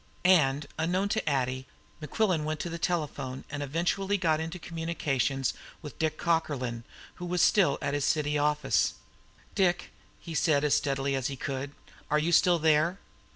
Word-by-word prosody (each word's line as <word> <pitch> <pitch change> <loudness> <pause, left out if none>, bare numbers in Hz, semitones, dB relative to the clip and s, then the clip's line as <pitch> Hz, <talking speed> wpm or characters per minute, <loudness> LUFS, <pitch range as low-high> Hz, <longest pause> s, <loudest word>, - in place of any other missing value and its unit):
And, 150 -6 +4
unknown 180 +5 0
to 220 -7 0
Addie, 130 -1 -1 0.3
Mequillen 170 +2 0
went 155 0 -3
to 175 - -4
the 170 - -5
telephone, 150 -7 -2
and 145 0 -4
eventually 175 +7 0
got 160 -4 +1
into 165 +3 -4
communication 155 -6 -2 0.4
with 150 - -9
Dick 155 -1 0
Cockerlyne, 135 -8 -1 0.3
who 180 - -6
was 175 0 +1
still 180 -10 +4
at 145 - -1
his 145 -1 0
city 150 0 +1
office. 150 -1 +1 0.6
"Dick!" 180 -3 +1 0.3
he 165 - -8
said 150 -2 +2
as 150 - +2
steadily 135 -1 0
as 135 0 0
he 140 - -4
could. 135 +1 -4 0.4
"Are 150 - +3
you 155 +3 +1
still 175 +1 +5
there?" 160 +3 +3
155 Hz, 160 wpm, -29 LUFS, 140-170 Hz, 0.6 s, still